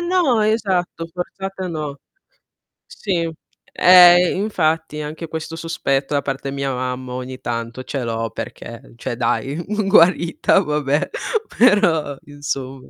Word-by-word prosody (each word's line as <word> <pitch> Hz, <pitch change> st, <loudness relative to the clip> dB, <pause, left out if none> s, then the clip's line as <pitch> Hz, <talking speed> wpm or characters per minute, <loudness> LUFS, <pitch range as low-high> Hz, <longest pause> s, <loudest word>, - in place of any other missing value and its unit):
no, 345 Hz, -10 st, +2 dB
esatto, 190 Hz, -6 st, 0 dB
forzata 185 Hz, +2 st, -6 dB
no. 150 Hz, -4 st, -5 dB, 0.9 s
Sì, 170 Hz, -5 st, -2 dB, 0.4 s
ehm, 180 Hz, 0 st, +7 dB
infatti 160 Hz, -6 st, -1 dB
anche 155 Hz, +3 st, -6 dB
questo 160 Hz, 0 st, -6 dB
sospetto 145 Hz, -4 st, -1 dB
da 145 Hz, -, +2 dB
parte 135 Hz, 0 st, -4 dB
mia, 140 Hz, -1 st, -2 dB
mamma, 125 Hz, 0 st, -4 dB
ogni 130 Hz, 0 st, -6 dB
tanto 115 Hz, +1 st, -4 dB
ce 135 Hz, -1 st, -4 dB
l'ho, 115 Hz, -1 st, -2 dB
perché, 115 Hz, +3 st, -9 dB
cioè 120 Hz, 0 st, -5 dB
dai, 135 Hz, +3 st, -1 dB
uhm, 200 Hz, +3 st, -2 dB
guarita, 170 Hz, -3 st, +4 dB
vabbè, 150 Hz, -1 st, 0 dB, 0.5 s
però, 170 Hz, -, +3 dB
insomma. 135 Hz, -2 st, -6 dB
155 Hz, 120 wpm, -20 LUFS, 135-180 Hz, 0.9 s, ehm